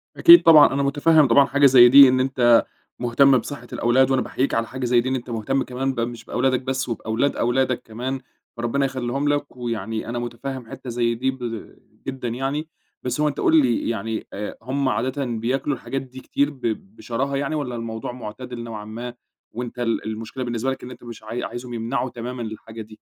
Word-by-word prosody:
أكيد 340 0 +9
طبعًا 155 -4 +7
أنا 140 - 0
متفهم 145 +2 +4
طبعًا 135 +3 +5
حاجة 140 +1 +2
زي 125 -2 +8
دي 135 0 +9
إن 130 - +2
أنت 125 -3 +3 0.3
مهتم 130 +2 +4
بصحة 125 0 -6
الأولاد، 130 +3 +2
وأنا 130 -1 +2
باحييك 135 +2 -2
على 115 0 0
حاجة 130 -1 -5
زي 120 0 +3
دي 130 - -3
إن 130 - 0
أنت 125 -1 -6
مهتم 120 +4 -1
كمان 135 +2 -3
ب 125 - -5
مش 115 -1 -4
بأولادك 130 +1 0
بس 130 -1 -3
وبأولاد 115 +4 -1
أولادك 125 +1 0
كمان 125 +4 -4 0.4
ربنا 120 +4 0
يخليهم 135 +1 -2
لك. 145 -2 -2
ويعني 115 -2 -4
أنا 120 - -3
متفهم 120 +1 -6
حتّة 125 - -8
زي 120 -1 0
دي 130 +3 0
ب 120 -4 -7 0.3
جدًا 130 -2 -4
يعني 135 +6 -3 0.4
بس 125 +3 -2
هو 150 - +3
أنت 145 - -3
قُل 160 -1 +5
لي 120 -4 0
يعني 110 0 -3
آآ 105 +1 -6
هُم 130 +3 -1
عادةً 130 +5 -1
بياكلوا 125 +4 -1
الحاجات 135 +1 -4
دي 130 0 -11
كتير 140 +2 0
ب 140 -3 -14 0.3
بشراهة 135 +4 -3
يعني 140 +2 -2
والّا 135 -5 -3
الموضوع 115 0 -5
معتدل 120 +1 -8
نوعًا 110 -3 -7
ما، 120 +3 -7 0.4
وأنت 125 +1 -6
ال 115 -1 -1
المشكلة 110 +4 -5
بالنسبة 120 +2 -2
لك 130 - -7
إن 125 - -8
أنت 125 - -13
مش 115 -2 -10
عاي 115 +3 -5
عايزهم 120 0 -6
يمنعوا 120 +3 -2
تمامًا 125 +1 -6
الحاجة 110 0 -8
دي 110 0 -13
125 Hz, 200 wpm, -22 LUFS, 115-135 Hz, 0.4 s, أكيد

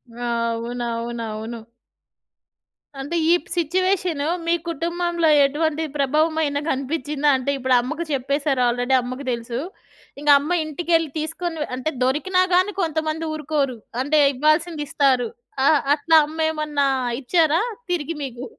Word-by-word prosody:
అవునవునవును. 235 -1 -3 1.4
అంటే 290 +5 -4 0.2
ఈ - - +7
ప్ - - -19
సిట్యుయేషన్ 355 -1 0 0.3
మీ 335 - +3 0.2
కుటుంబంలో 340 +1 0 0.2
ఎటువంటి 315 +2 -1
ప్రభావం 305 +4 +2
అయిన 285 -1 0
గనిపిచ్చిందా? 285 +2 -1
అంటే 260 +2 -2
ఇప్పుడు 260 -1 +2
అమ్మకు 305 +7 -4
చెప్పేసారు 275 0 0
ఆల్రెడీ 245 +2 +1
అమ్మకి 255 +3 -6
దెలుసు. 235 0 -4 0.6
ఇంగ 295 - -1
అమ్మ 295 +5 -4
ఇంటికెళ్ళి 330 +1 0
తీసుకొని 325 +1 -4 0.2
అంటే 260 +5 -2
దొరికినా 340 +9 +1
గాని 370 +3 +3
కొంతమంది 315 -1 -1
ఊరుకోరు. 290 -5 -1 0.3
అంటే 300 +2 +2
ఇవ్వాల్సిందిస్తారు. 295 -3 +1 0.4
ఆ! - - +5 0.3
అట్లా 325 +2 +2
అమ్మేమన్నా 305 -2 0 0.3
ఇచ్చారా 320 +4 +2 0.3
తిరిగి 335 -1 -2
మీకు? 255 -2 -6
295 Hz, 115 wpm, -22 LUFS, 255-320 Hz, 1.4 s, ఈ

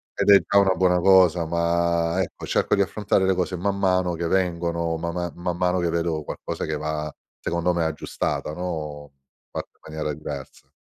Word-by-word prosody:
ed - - +1
è 100 - +8
già 100 - +5
una 95 -2 +3
buona 90 0 +3
cosa, 90 -3 +5
ma 85 +1 +1
ecco, 90 - -5
cerco - - +2
di 100 - +2
affrontare 100 0 +1
le 95 - +3
cose 90 0 -1
man 100 +3 -1
mano 90 -2 +2
che 85 0 -2
vengono, 85 -2 0
ma 85 +1 -3
ma 85 0 -3
man 85 0 -3
mano 90 0 +1
che 85 -1 0
vedo 85 -2 -1
qualcosa - - -5
che 80 - -2
va 75 0 -3 0.3
secondo 85 +1 0
me 85 -1 0
aggiustata, 80 -1 -2
no, 75 -4 -5 0.4
fatta - - -5
in - - -37 0.2
maniera 75 -1 -2
diversa. 70 -2 -8
85 Hz, 190 wpm, -24 LUFS, 80-90 Hz, 0.4 s, è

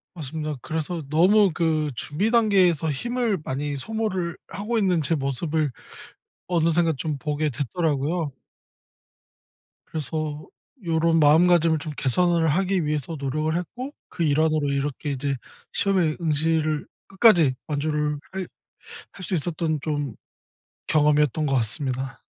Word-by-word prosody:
맞습니다. 155 -1 -4
그래서 160 +3 -3
너무 190 +6 +5
그 155 -2 +1
준비 155 - -1
단계에서 190 - +3
힘을 235 - -1
많이 145 +2 -3
소모를 190 0 -2
하고 215 +4 -3
있는 185 -6 +2
제 165 +3 +1
모습을 145 +2 -1 0.8
어느새인가 165 -1 +2
좀 150 +1 -3
보게 150 +2 -1
됐더라고요. 150 +2 -1 1.5
그래서 155 0 -4 0.4
요런 165 0 +2
마음가짐을 165 +1 +5
좀 150 +1 -6
개선을 165 +4 +2
하기 185 +2 +1
위해서 150 +1 -2
노력을 155 +4 -1
했고 250 - -6 0.2
그 170 - -3
일환으로 155 -1 +2
이렇게 140 +1 -2
이제 140 0 -1 0.4
시험에 185 -6 +1
응시를 155 -1 +1 0.2
끝까지 180 - +5
완주를 150 0 -1
할 190 -1 -4 0.7
할 185 - -10
수 185 - -4
있었던 160 -1 -1
좀 145 -5 -2 0.7
경험이었던 150 0 +3
것 135 - +1
같습니다. 130 +2 -2
155 Hz, 285 characters per minute, -24 LUFS, 145-175 Hz, 1.5 s, 너무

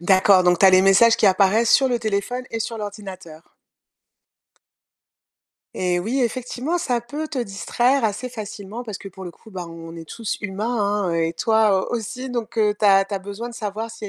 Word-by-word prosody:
D'accord, 185 +1 +5
donc 180 -1 +3
tu 195 - +6
as 190 - +8
les 185 0 +6
messages 195 +4 +5
qui - - 0
apparaissent 200 +4 +4
sur 270 - +5
le 245 -2 0
téléphone 220 +3 -2
et 225 - -3
sur 225 0 -4
l'ordinateur. 190 -6 -9 2.2
Et 180 -1 0
oui 240 +9 -1
effectivement, 255 +7 -2
ça 245 -6 0
peut 295 +6 -5
te 285 - -4
distraire 240 +4 0
assez 225 +4 -2
facilement 215 -1 -7
parce 215 -5 -6
que 200 - -12
pour 190 0 -11
le - - -6
coup, 220 +6 -18
bah, 180 -3 -6
on 165 0 -10
est 165 -1 -10
tous 230 -3 -4
humains 205 0 -4 0.4
hein, 180 - 0
heu, 165 0 +1
et 165 - -4
toi 215 +1 +2
aussi 245 +3 -4
donc 235 -2 -4
heu, 210 -1 +2
tu 210 - +2
as 195 -1 +6
tu 195 - -12
as 195 - 0
besoin 200 +5 -7
de - - -11
savoir 220 +1 -5
si 230 -1 -10
il - - -3
y - - -6
210 Hz, 215 wpm, -22 LUFS, 190-235 Hz, 2.2 s, as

